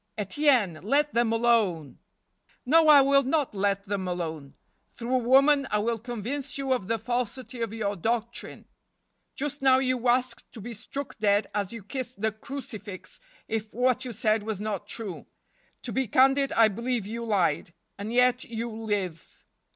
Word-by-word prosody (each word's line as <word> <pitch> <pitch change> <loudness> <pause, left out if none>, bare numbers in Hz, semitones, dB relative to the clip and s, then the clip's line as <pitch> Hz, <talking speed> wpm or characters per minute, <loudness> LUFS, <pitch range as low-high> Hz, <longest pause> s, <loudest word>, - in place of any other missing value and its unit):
Etienne, 215 - +2
let 290 +8 +1
them 235 -1 +2
alone! 225 - +1 0.3
" - - -49
" - - -35
No, 320 +4 +5
I 295 -2 +9
will 275 +1 +5
not 280 0 0
let 200 0 0
them 195 -2 -3
alone. 160 -5 -4 0.4
Through 240 +2 -4
a - - +5
woman 275 +3 +4
I 210 - +1
will 225 +2 0
convince 245 +4 -4
you 270 -1 0
of 240 -8 -3
the 230 +1 0
falsity 245 +1 -3
of 230 -2 -2
your 210 -2 -2
doctrine. 235 +5 -3 0.7
Just 290 0 -3
now 265 -1 +5
you 255 -2 0
asked 250 +1 0
to 235 - -9
be 235 +3 -7
struck 275 +5 -7
dead 205 -1 +3
as 200 -2 -1
you 230 -3 -8
kissed 255 +2 -5
the 220 +1 +1
crucifix 215 -4 -8 0.3
if 220 -1 -4
what 255 +1 +2
you 255 - -5
said 215 0 +1
was 215 -2 -4
not 210 -3 -4
true. 210 -6 -6 0.6
To - - -4
be 265 -1 0
candid, 270 +4 +4
I 225 -1 +6
believe 235 +1 -2
you 230 +3 -5
lied. 190 -8 0 0.3
And 205 +2 -4
yet 250 +1 +3
you 235 0 -5
live. 205 -7 -4
230 Hz, 175 wpm, -27 LUFS, 205-255 Hz, 0.7 s, I